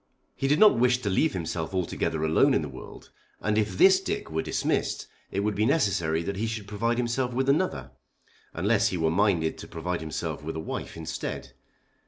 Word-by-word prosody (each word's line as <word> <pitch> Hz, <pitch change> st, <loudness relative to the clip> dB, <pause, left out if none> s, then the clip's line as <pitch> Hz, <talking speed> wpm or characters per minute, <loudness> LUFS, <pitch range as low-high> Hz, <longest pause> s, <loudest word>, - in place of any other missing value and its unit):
He 135 Hz, -, -1 dB
did 145 Hz, +2 st, +3 dB
not 210 Hz, -, +6 dB
wish 125 Hz, 0 st, +4 dB
to 100 Hz, -, 0 dB
leave 155 Hz, +11 st, +2 dB
himself 85 Hz, 0 st, -3 dB
altogether 80 Hz, -3 st, -1 dB
alone 80 Hz, 0 st, +4 dB
in -, -, +1 dB
the -, -, -4 dB
world, -, -, -11 dB, 0.3 s
and 105 Hz, 0 st, 0 dB
if 105 Hz, -3 st, 0 dB
this 190 Hz, 0 st, +7 dB
Dick 190 Hz, -, -4 dB
were 80 Hz, 0 st, 0 dB
dismissed -, -, -1 dB, 0.2 s
it 100 Hz, -, -2 dB
would 105 Hz, +1 st, 0 dB
be 105 Hz, -, 0 dB
necessary 90 Hz, -, +1 dB
that 100 Hz, +2 st, -4 dB
he 110 Hz, +3 st, -1 dB
should 110 Hz, -2 st, -4 dB
provide 115 Hz, +4 st, -1 dB
himself 125 Hz, +1 st, -1 dB
with 130 Hz, +2 st, 0 dB
another, 155 Hz, +7 st, 0 dB, 0.6 s
unless 105 Hz, +5 st, +2 dB
he 95 Hz, -, -2 dB
were 80 Hz, -1 st, +1 dB
minded 90 Hz, -4 st, +1 dB
to -, -, -8 dB
provide 85 Hz, +1 st, -4 dB
himself 80 Hz, -1 st, -4 dB
with 80 Hz, +1 st, -5 dB
a -, -, -3 dB
wife 80 Hz, -, -5 dB
instead. 80 Hz, -1 st, -5 dB
100 Hz, 200 wpm, -27 LUFS, 80-120 Hz, 0.6 s, this